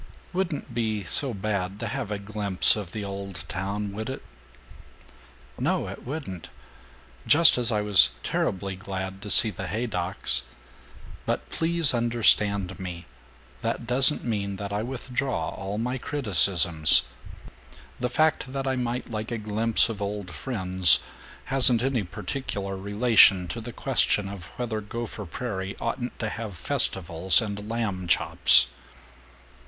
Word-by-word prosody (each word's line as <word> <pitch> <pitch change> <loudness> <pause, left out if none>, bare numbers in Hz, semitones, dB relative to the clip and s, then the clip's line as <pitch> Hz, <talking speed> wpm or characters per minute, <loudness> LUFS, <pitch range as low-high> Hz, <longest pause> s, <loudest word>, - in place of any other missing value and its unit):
"Wouldn't 170 -8 -3
be 110 -3 -2
so 135 +8 -1
bad 100 -2 -4
to 115 - -4
have 120 -1 -5
a 105 - -2
glimpse 100 -2 +2
of 100 -5 -7
the 105 0 -6
old 100 -2 -7
town, 100 +3 -4
would 110 +4 -6
it!" 130 - -7 1.4
"No, - - -1
it - - -10
wouldn't. 120 - -7 0.8
Just 165 +2 +6
as 120 -1 0
I 105 -1 0
was 100 -12 +6
terribly 95 0 -2
glad 95 -1 -7
to 105 - -8
see 110 +2 +6
the 95 0 -7
Haydocks. 90 - -1 0.9
But - - -3
please 165 -3 +1
understand 105 -5 +2
me! 90 -2 -7 0.6
That - - -3
doesn't 130 +4 +3
mean 100 -4 -3
that 100 +1 -6
I 105 - -2
withdraw 125 -5 -4
all 100 +2 -6
my 125 +3 -3
criticisms. 90 - +4 1.0
The 125 - -2
fact 155 -1 0
that 135 -1 -4
I 130 -1 -1
might 125 -1 -4
like 110 +1 -5
a 120 - -2
glimpse 110 +1 +2
of 110 -3 -7
old 100 -2 -5
friends 95 -8 +5 0.5
hasn't 125 -3 +3
any 135 -3 0
particular 100 0 -5
relation 100 -2 +3
to 115 - -5
the 120 +2 -8
question 115 -6 +1
of 95 -2 -9
whether 115 -3 -4
Gopher 110 -1 -7
Prairie 95 -2 -6
oughtn't 120 +1 -4
to 110 - -4
have 105 -4 -7
festivals 85 +2 +3
and 105 -1 -5
lamb 105 -6 -3
chops." 65 -6 +5
105 Hz, 140 wpm, -25 LUFS, 95-120 Hz, 1.4 s, Just